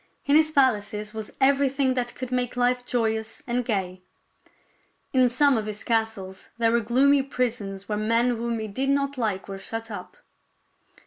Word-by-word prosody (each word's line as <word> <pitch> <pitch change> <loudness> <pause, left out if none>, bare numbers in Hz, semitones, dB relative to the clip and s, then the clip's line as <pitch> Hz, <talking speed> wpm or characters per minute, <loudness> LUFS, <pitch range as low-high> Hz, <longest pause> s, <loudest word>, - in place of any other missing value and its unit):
In 280 - +3
his 310 0 +5
palaces 210 -7 +1
was 220 -1 -5
everything 275 -1 +3
that 245 -1 -2
could 255 -1 -6
make 250 -1 -1
life 245 0 +1
joyous 220 -2 -1
and 245 0 -1
gay. 190 -5 -2 1.1
In 255 -1 +4
some 270 +1 +4
of 215 - -5
his 210 0 -6
castles 220 -5 -2
there 230 -1 +3
were 235 - +3
gloomy 270 +5 +4
prisons 225 -7 -3
where 210 -1 -2
men 230 +3 +2
whom 235 -1 -1
he 220 -1 -4
did 260 +7 -2
not 280 0 +1
like 215 -6 -2
were 195 -1 -6
shut 225 +2 -6
up. 205 - -8
235 Hz, 170 wpm, -25 LUFS, 215-260 Hz, 1.1 s, his